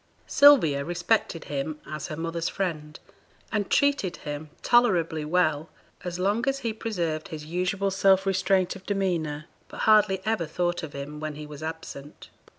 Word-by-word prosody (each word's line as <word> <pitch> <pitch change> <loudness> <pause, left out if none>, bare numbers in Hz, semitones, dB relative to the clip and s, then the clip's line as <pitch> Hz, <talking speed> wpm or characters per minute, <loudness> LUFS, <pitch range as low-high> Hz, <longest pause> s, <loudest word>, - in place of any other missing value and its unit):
Sylvia 245 - +6
respected 175 +1 0
him 150 +2 -4
as 155 -2 -5
her 155 - -5
mother's 165 0 -2
friend, 155 -5 -4 0.5
and 205 -3 -1
treated 280 -11 +2
him 150 +1 -6
tolerably 175 -10 +3
well 155 -1 +1 0.3
as 175 -1 -4
long 200 +5 +1
as 270 - -1
he 225 - 0
preserved 175 -8 -3
his 155 -5 -7
usual 185 +4 -1
self 190 0 +4
restraint 190 -1 +1
of 190 - -11
demeanour, 170 -7 -1 0.2
but - - -8
hardly 210 -3 +4
ever 215 -7 0
thought 175 +2 -1
of 155 -3 -7
him 145 +2 -6
when 155 -1 -4
he 150 0 -7
was 150 0 -10
absent. 155 -3 -8
175 Hz, 155 wpm, -26 LUFS, 155-195 Hz, 0.5 s, Sylvia